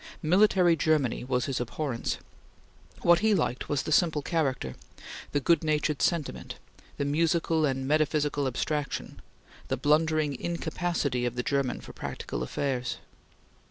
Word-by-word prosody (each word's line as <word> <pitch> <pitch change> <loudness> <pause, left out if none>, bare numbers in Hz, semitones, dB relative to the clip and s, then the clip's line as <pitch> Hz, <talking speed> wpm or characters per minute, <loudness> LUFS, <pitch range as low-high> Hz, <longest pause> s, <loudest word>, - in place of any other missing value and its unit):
Military 180 0 +4
Germany 155 -7 +1
was 125 -1 0
his 135 -3 -2
abhorrence. 125 +1 -2 0.9
What 170 0 +6
he 215 +1 +3
liked 130 -8 -1
was 145 -2 0
the - - -4
simple 155 -3 +3
character; 135 - -1 0.6
the 145 - +1
good 165 +3 +3
natured 150 -1 0
sentiment; 170 -5 -1 0.4
the 140 - -1
musical 160 +1 +2
and 135 -1 -2
metaphysical 150 -1 +1
abstraction; 145 +3 -3 0.5
the - - -1
blundering 155 -1 +2
incapacity 170 -6 -1
of 120 - -4
the 125 - -1
German 140 -2 0
for - - -11
practical - - -5
affairs. 125 - -2
150 Hz, 130 wpm, -28 LUFS, 135-165 Hz, 0.9 s, What